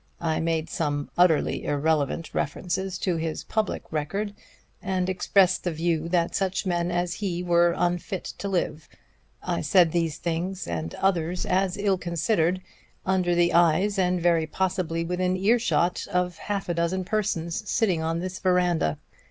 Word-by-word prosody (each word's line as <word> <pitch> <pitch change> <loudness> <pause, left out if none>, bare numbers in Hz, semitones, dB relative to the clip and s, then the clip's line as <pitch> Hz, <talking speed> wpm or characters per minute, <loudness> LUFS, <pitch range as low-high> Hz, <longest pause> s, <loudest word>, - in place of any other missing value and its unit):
I 160 -2 0
made 165 -1 0
some 145 -3 -2
utterly 175 -3 +3
irrelevant 150 +1 0
references 185 +5 -2
to 180 -2 -1
his 160 -1 -3
public 215 -3 -2
record, 180 +8 -2 0.5
and 185 -2 -1
expressed 185 0 +2
the 175 - -1
view 165 0 -1
that 170 -1 +1
such 195 +1 -1
men 175 -1 0
as 175 0 -1
he 180 -4 -3
were 175 -1 +3
unfit 175 +2 -1 0.2
to 200 - -3
live. 160 -4 -2 0.5
I - - -1
said 180 -5 +4
these 165 -3 0
things, 175 +3 -3
and 80 -1 -4
others 180 -2 0
as 185 +1 +1
ill 200 -2 +1
considered, 175 +1 0 0.4
under 185 -2 +2
the 175 0 +3
eyes, 175 +4 +3
and 180 -1 +2
very 165 -2 +2
possibly 175 -1 -1
within 180 +1 0
earshot, 200 -3 +2
of 180 -1 0
half 200 -2 -3
a 175 - 0
dozen 170 +3 0
persons 205 -2 -2
sitting 190 -8 +1
on 165 +1 -1
this 185 0 -5
veranda. 180 - +2
175 Hz, 150 wpm, -26 LUFS, 165-185 Hz, 0.5 s, said